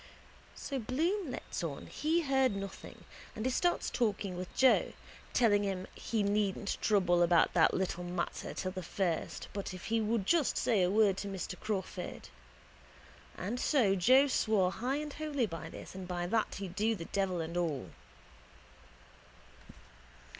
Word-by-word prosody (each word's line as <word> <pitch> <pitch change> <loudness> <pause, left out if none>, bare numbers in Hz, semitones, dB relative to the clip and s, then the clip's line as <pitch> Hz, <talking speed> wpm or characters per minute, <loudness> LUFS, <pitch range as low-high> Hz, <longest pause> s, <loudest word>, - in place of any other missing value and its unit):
So 275 -2 -4
Bloom 325 - -1
lets 250 - -5
on 150 -4 -4
he 320 +3 0
heard 265 -6 +2
nothing 195 0 -7 0.3
and 220 - -4
he 260 - +2
starts 350 +7 +1
talking 205 -5 -1
with 180 0 -6
Joe, 260 -1 +4 0.4
telling 210 -4 +4
him 190 -2 -2
he 220 -3 -1
needn't 200 0 0
trouble 180 -5 +3
about 170 -1 +4
that 165 - +4
little 180 -1 -1
matter 175 0 -4
till 185 - -2
the 185 - -5
first 175 -1 -2
but 195 -2 -4
if 185 - -9
he 225 - +3
would 215 -2 0
just 325 - +2
say 215 -5 +2
a 180 - +3
word 205 -1 +4
to 200 - -4
Mr 190 -2 -4
Crawford. 195 -4 -4 1.1
And 215 +7 -3
so 250 -9 +3
Joe 255 +9 +6
swore 215 -8 +2
high 250 +7 -2
and 295 0 -4
holy 295 -5 -1
by 165 -4 -6
this - - -10
and 190 -1 -7
by 175 -1 -2
that 220 +4 0
he'd 190 -3 -6
do 215 +3 +1
the 170 -4 -7
devil 190 -2 -1
and 165 +1 -4
all. 150 - -2
200 Hz, 160 wpm, -32 LUFS, 180-245 Hz, 1.1 s, Joe